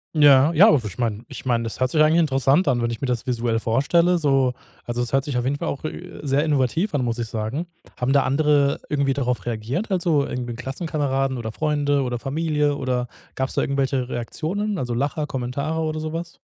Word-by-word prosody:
Ja, 145 -1 +6
ja, 175 +6 +7
also, 125 -8 +2
ich - - -11
meine 115 -3 -2
ich - - -9
meine, 120 -2 +1
das 115 - -5
hört 130 0 +2
sich 155 - +3
eigentlich 155 +2 +4
interessant 140 +2 +2
an, 125 -3 +2
wenn 115 - 0
ich 115 - -5
mir 135 - -2
das 125 -2 -2
visuell 120 -2 0
vorstelle, 170 +10 +2
so. 135 -5 +2 0.3
Also, 120 0 -3
es 120 - -3
hört 135 0 +3
sich 140 -4 -3
auf 120 - -1
jeden 135 +2 +1
Fall - - -3
auch, 140 - -5
äh, 155 - -7
sehr 145 0 +1
innovativ 155 - +1
an, 135 -4 0
muss 115 -1 -1
ich 120 -1 -3
sagen. 110 +10 -3 0.3
Haben 125 +2 -1
da 140 -1 +4
andere 145 0 +2
irgendwie 140 -2 +1
darauf 125 -3 -2
reagiert, 120 - -3
also, 170 -7 +1
irgendwie 120 -2 -4
Klassenkameraden 135 0 -2
oder 110 -2 -5
Freunde 145 -1 +1
oder 125 -2 -3
Familie 150 +2 0
oder 125 -3 -1 0.3
gab 130 - 0
es - - -8
da - - +2
irgendwelche 135 -2 0
Reaktionen, 185 - -3
also, 125 -6 -2
Lacher, 145 +5 -1
Kommentare 140 +5 -3
oder 155 -1 -2
so 155 0 -4
was? 170 +2 -6
135 Hz, 220 wpm, -23 LUFS, 125-155 Hz, 0.3 s, ja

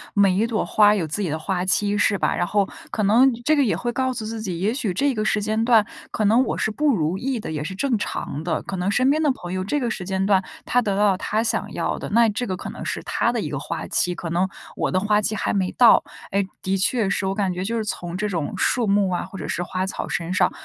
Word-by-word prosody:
每 200 -2 +5
一 215 +4 +2
朵 230 -2 -1
花 210 0 +5
有 185 -5 -1
自 155 +7 -3
己 185 - -1
的 155 - -1
花 180 +3 -2
期， 205 +2 +1
是 205 0 +2
吧？ - - 0
然 175 - 0
后 200 0 +1 0.2
可 215 - -2
能 235 +7 +5
这 310 - +4
个 285 - +3
也 225 - +1
会 240 - -2
告 260 +1 0
诉 225 -3 -5
自 225 0 -5
己， 185 -6 -4
也 205 +5 +1
许 250 -7 -2
这 275 +10 +1
个 215 -3 -1
时 215 - +1
间 215 +2 0
段， 230 -3 +5 0.2
可 215 - -1
能 225 +5 +5
我 - - -2
是 220 - 0
不 290 +3 +2
如 160 -1 0
意 260 -2 -2
的， 210 - -6
也 150 -1 -3
是 190 +5 -5
正 265 +4 0
常 150 -6 -4
的。 160 -2 -2
可 195 - -5
能 180 +1 -1
身 255 +6 +3
边 310 +2 +1
的 305 - +3
朋 180 -9 -6
友 185 0 -1
这 290 +10 -1
个 240 -4 -1
时 190 - -4
间 190 +1 -1
段， 195 -1 +3 0.2
他 245 - +2
得 200 -4 -1
到 205 0 +4
了 190 - -1
他 215 +2 0
想 230 - -1
要 - - -2
的。 - - -5
那 230 +2 +4
这 240 +4 -3
个 185 -2 -2
可 - - -6
能 - - -8
是 - - -3
他 - - 0
的 - - -2
一 - - -3
个 - - -3
花 - - -5
期， 180 0 0
可 170 -2 -5
能 180 +3 +1 0.3
我 - - -1
的 185 - +1
花 210 +1 +2
期 215 +1 -1
还 - - -1
没 190 -2 0
到。 240 -3 +6 0.3
哎， 200 0 +2 0.2
的 190 +1 0
确 205 +3 +1
是， 190 0 -1
我 190 - -1
感 195 -3 0
觉 180 +1 -3
就 230 +4 -2
是 220 - -2
从 175 -3 -4
这 210 +2 -1
种 170 -7 -2
树 240 -3 +1
木 200 -1 +2
啊， 180 - -1
或 195 - -10
者 165 - -5
是 - - -2
花 185 +1 -2
草 190 - -5
身 170 +1 -2
上， 185 - +3
205 Hz, 310 characters per minute, -23 LUFS, 185-225 Hz, 0.3 s, 到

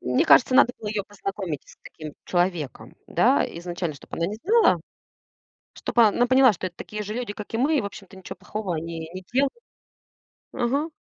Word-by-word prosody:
Мне 125 0 +1
кажется, 255 0 +6
надо 260 -2 +6
было 210 - -5
ее 210 -1 -1
познакомить 195 -6 -5
с - - -16
таким 155 -2 -10
человеком, 175 -6 -2
да. - - +3
Изначально, 175 -2 -4
чтоб 140 - -16
она 165 - -1
не 205 +4 -4
знала, 450 +4 +4 0.9
чтоб - - -7
она 230 +2 +5
поняла, 255 -2 +6
что 185 +1 -4
это 175 - -13
такие 210 0 -6
же 210 +1 -5
люди, 240 -3 -4
как 210 +1 -9
и - - 0
мы. 290 +6 +2
И, 265 - +2
общем-то, 200 -1 -9
ничего 190 - -8
плохого 205 -5 -4
они 165 +1 -5
не 185 - -7
делают. 270 +2 +2 1.0
Ага. 280 +7 0
205 Hz, 185 wpm, -24 LUFS, 175-245 Hz, 1.0 s, кажется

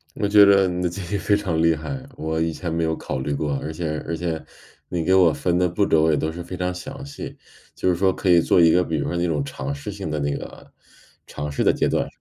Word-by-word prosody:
我 100 - 0
觉 105 0 +7
得 100 -1 +6
你 90 0 -2
的 90 - +1
建 90 +3 -6
议 - - +2
非 100 +1 +2
常 85 -6 -1
厉 85 0 +4
害， 130 - -6
我 80 +1 -2
以 80 0 +1
前 85 +1 -4
没 85 0 0
有 80 0 0
考 - - -4
虑 70 +2 -3
过， 70 0 -1
而 80 - -4
且 80 -1 -3
而 85 - -2
且 80 -2 -3 0.5
你 85 -2 -2
给 95 - +3
我 90 -3 +6
分 90 +2 0
的 90 -1 +2
步 100 +4 +1
骤 80 - +3
我 80 - +4
也 75 - +2
都 80 +2 -1
是 85 +2 -7
非 90 +2 -7
常 90 0 -1
详 135 +9 -8
细， 140 -1 -8 0.4
就 - - -2
是 90 - +2
说 95 +2 +2
可 95 - -5
以 85 -1 +6
做 - - +3
一 85 -1 +6
个 90 - +4
比 80 -2 -3
如 70 - -2
说 - - -3
那 85 0 0
种 75 -4 0
尝 70 0 -5
试 70 +8 -6
性 100 -4 -6
的 75 0 -2
那 70 -1 -1
个 - - -10 0.6
尝 75 0 -5
试 70 - -1
的 - - +5
阶 - - 0
段， - - 0
85 Hz, 305 characters per minute, -23 LUFS, 80-95 Hz, 0.6 s, 觉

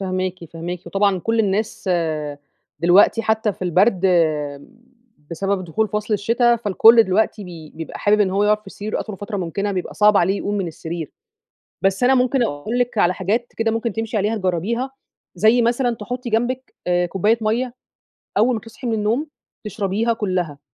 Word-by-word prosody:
فاهماكِ، 185 -2 -3
فاهماكِ، 170 +2 -6
وطبعًا 195 +1 +1
كل 225 +5 0
الناس 205 0 -1 0.9
دلوقتي 185 +6 +5
حتى 220 -1 +1
في - - -11
البرد 185 +2 +3 1.2
بسبب 195 +2 -2
دخول 215 +6 -1
فصل 210 +1 -1
الشتا، 235 +4 +2
فالكل 225 +2 +6
دلوقتي 210 +1 0
ب 160 -4 -11
بيبقى 160 - -7
حابب 210 +1 +3
إن 190 -2 +3
هو 200 +2 +1
يقعد 210 0 +2
في 195 - -11
سريره 210 +1 -4
أطول 210 -3 -6
فترة 205 +1 -5
ممكنة، 195 +3 -2
بيبقى 180 -2 -4
صعب 210 -1 +5
عليه 195 +2 +3
يقوم 205 - -2
من 195 -3 -1
السرير، 165 0 -6 0.7
بس 195 +5 +1
أنا 265 +1 +5
ممكن 250 0 +2
أقول 215 +7 -2
لِك 245 -2 -1
على 180 -2 +3
حاجات 215 +7 -2
كده 225 0 +1
ممكن 230 -1 -2
تمشي 225 0 -2
عليها 210 +3 0
تجَرّبيها، 210 +8 -1 0.4
زي 220 +6 +4
مثلًا 240 0 +1
تحُطّي 245 +3 -5
جنبك 245 +4 -1
آآ 175 0 +2
كُوبّاية 205 +6 +1
مَيّة 235 +3 0 0.7
أول 235 +4 +3
ما 220 - -3
تصحي 225 +3 -10
من 230 - 0
النوم 220 +8 0 0.4
تشربيها 210 +3 -1
كلها. 185 -9 -2
210 Hz, 170 wpm, -21 LUFS, 185-230 Hz, 1.2 s, فالكل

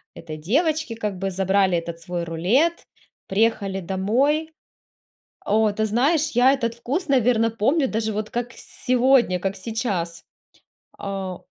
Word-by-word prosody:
этой 155 -1 -8
девочки, 295 - 0
как 210 -4 -3
бы 195 +1 -2
забрали 190 -1 +2
этот 170 0 -7
свой 175 +1 -4
рулет, 220 - +1 0.4
приехали 195 -2 0
домой. 250 - 0 0.9
О, 215 +1 +3
ты 215 +1 0
знаешь, 285 +8 +1
я 250 +3 +5
этот 235 -4 -2
вкус, 275 +9 -3
наверно, 240 -4 +3
помню 265 +7 +1
даже 220 -1 -1
вот 215 +1 -4
как 240 0 -2
сегодня, 250 -6 +2
как 195 +1 -2
сейчас. 190 -5 -3 0.7
А 195 -2 -4
220 Hz, 130 wpm, -23 LUFS, 190-255 Hz, 0.9 s, я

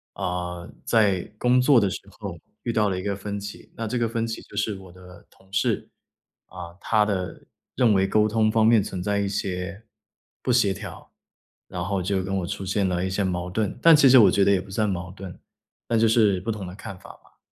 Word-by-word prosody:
呃， 90 -1 -4 0.2
在 100 -6 +3 0.2
工 125 +1 +4
作 130 -1 +5
的 100 -3 +1
时 - - -5 0.2
候 - - -6 0.3
遇 120 - -2
到 105 -2 +2
了 90 -1 -2
一 - - -6
个 100 -1 -1
分 100 +1 -5
歧， 100 0 -9
那 115 - -3
这 125 - -2
个 120 -1 0
分 115 0 -2
歧 115 - -5
就 105 - -12
是 105 0 0
我 95 -2 -13
的 90 0 -15
同 95 0 -25
事。 95 - 0 0.6
啊， 90 -2 -8
他 105 0 +2
的 95 -3 -3 0.3
认 120 -4 +4
为 95 -1 +2
沟 105 +2 +3
通 110 0 +2
方 110 0 +3
面 115 -2 +5
存 95 -2 -5
在 100 0 0
一 100 - 0
些 95 0 -4 0.6
不 - - -5
协 115 -5 +3
调， - - -10 0.6
然 90 - -5
后 100 0 -1
就 95 +1 -1
跟 95 +1 -2
我 90 -2 -2
出 100 0 -5
现 95 +1 0
了 90 0 -1
一 - - -2
些 95 +2 -1
矛 90 -1 -2
盾， 105 +2 -2
但 165 - +8
其 145 -2 +6
实 130 0 +8
我 110 - +7
觉 100 - +3
得 100 - +4
也 95 - +1
不 95 - -13
算 105 +1 0
矛 90 -1 -4
盾， 95 -2 -9 0.5
那 115 - +2
就 115 +1 +4
是 110 -4 +3
不 100 - -6
同 105 -3 -5
的 90 - -8
看 95 -1 -9
法 - - -15
吧， - - -28
100 Hz, 250 characters per minute, -24 LUFS, 95-110 Hz, 0.6 s, 但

